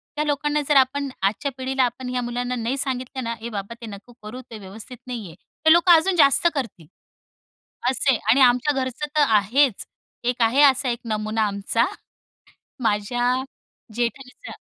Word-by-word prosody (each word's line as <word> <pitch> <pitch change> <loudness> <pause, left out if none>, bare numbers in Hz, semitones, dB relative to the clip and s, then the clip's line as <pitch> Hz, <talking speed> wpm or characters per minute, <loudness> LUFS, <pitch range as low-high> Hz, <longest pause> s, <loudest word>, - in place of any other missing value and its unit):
त्या 300 - 0
लोकांना 295 0 0
जर 295 - +3
आपण 270 +1 +2
आजच्या 205 +8 -1
पिढीला 260 0 0
आपण 250 +1 -3
ह्या 250 0 -2
मुलांना 245 +1 -3
नाही 240 +3 -2
सांगितलं 260 -1 -3
ना, 230 - -3
"ए 235 - -5
बाबा, 200 +1 -6
ते 230 - -7
नको 210 +3 -11
करू, 230 +5 -8
ते 225 - -7
व्यवस्थित 210 +6 -10
नाहीये," 215 -10 -7 0.3
ते 315 - +7
लोकं 345 +1 +5
अजून 340 +3 +3
जास्त 320 +1 +5
करतील. 220 - -5 1.0
असं 265 +1 +2
आहे. 240 - 0
आणि 260 +5 +5
आमच्या 250 +3 +4
घरचं 260 +3 -4
तर 300 - +5
आहेच. 225 +3 +2 0.4
एक 245 0 -1
आहे 235 +5 +3
असा 265 -2 +4
एक 235 -1 -2
नमुना 215 0 -2
आमचा, 200 +4 0 1.0
माझ्या 245 +3 0 0.6
जेठानीचा. 250 - -4
250 Hz, 165 wpm, -22 LUFS, 225-270 Hz, 1.0 s, ते